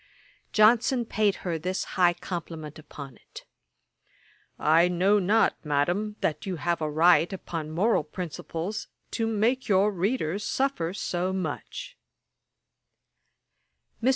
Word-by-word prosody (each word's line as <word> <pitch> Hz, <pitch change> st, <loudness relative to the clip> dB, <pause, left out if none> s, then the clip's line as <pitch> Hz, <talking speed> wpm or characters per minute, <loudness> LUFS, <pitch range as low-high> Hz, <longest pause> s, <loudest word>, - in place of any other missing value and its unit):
Johnson 235 Hz, +3 st, +4 dB
paid 210 Hz, -2 st, +1 dB
her 170 Hz, -3 st, -1 dB
this 185 Hz, +4 st, -2 dB
high 175 Hz, -2 st, +4 dB
compliment 165 Hz, -4 st, -6 dB
upon 140 Hz, -3 st, -10 dB
it: -, -, -13 dB, 1.1 s
'I 165 Hz, +3 st, +4 dB
know 185 Hz, +4 st, +3 dB
not, 205 Hz, +4 st, +2 dB
Madam, 175 Hz, +9 st, 0 dB
that 155 Hz, -, -1 dB
you 185 Hz, -, -2 dB
have 170 Hz, +1 st, -1 dB
a 155 Hz, -, 0 dB
right, 170 Hz, +3 st, +4 dB
upon 165 Hz, -5 st, -5 dB
moral 180 Hz, +3 st, +2 dB
principles, 170 Hz, +4 st, -5 dB, 0.2 s
to 225 Hz, -1 st, -1 dB
make 225 Hz, +4 st, +1 dB
your 200 Hz, +1 st, +4 dB
readers 195 Hz, -1 st, -1 dB
suffer 265 Hz, -13 st, -1 dB
so 180 Hz, -1 st, -1 dB
much.' 190 Hz, -, -5 dB, 2.0 s
Mr. 250 Hz, -, +3 dB
180 Hz, 120 wpm, -27 LUFS, 165-215 Hz, 2.0 s, Johnson